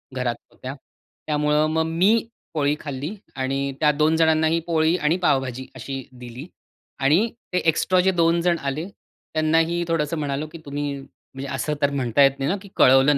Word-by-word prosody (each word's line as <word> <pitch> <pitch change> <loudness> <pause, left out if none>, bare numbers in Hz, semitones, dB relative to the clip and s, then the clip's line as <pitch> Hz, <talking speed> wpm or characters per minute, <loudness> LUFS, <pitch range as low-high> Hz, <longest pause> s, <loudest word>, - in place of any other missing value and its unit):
घरात 125 -2 -1 0.2
होत्या. 130 +1 -7 0.5
त्यामुळं 150 0 +2
मग 160 - +2
मी 195 +8 +3 0.3
पोळी 145 -1 +1
खाल्ली 145 +4 -5 0.2
आणि 135 +1 -1
त्या 150 -1 +4
2 155 +2 +2
जणांनाही 160 0 +3
पोळी 160 0 +2
आणि 160 +1 +1
पावभाजी 130 -2 +1
अशी 135 +1 -5
दिली 125 +3 -9 0.5
आणि 155 +11 +3 0.3
ते 180 - +3
एक्स्ट्रा 185 +3 +1
जे 190 +1 +3
2 165 +1 +3
जण 175 0 +2
आले 140 +6 -3
त्यांनाही 165 -1 -1
थोडंसं 165 -1 0
म्हणालो 145 0 -2
की 155 - -10
"तुम्ही, 145 0 -3
म्हणजे 135 0 -11
असं 150 +4 -1
तर 140 - +4
म्हणता 135 -1 +1
येत 135 0 +3
नाही 135 +2 0
ना, 200 - 0
की 200 - -13
कळवलं 135 +3 +6
150 Hz, 170 wpm, -23 LUFS, 135-165 Hz, 0.5 s, कळवलं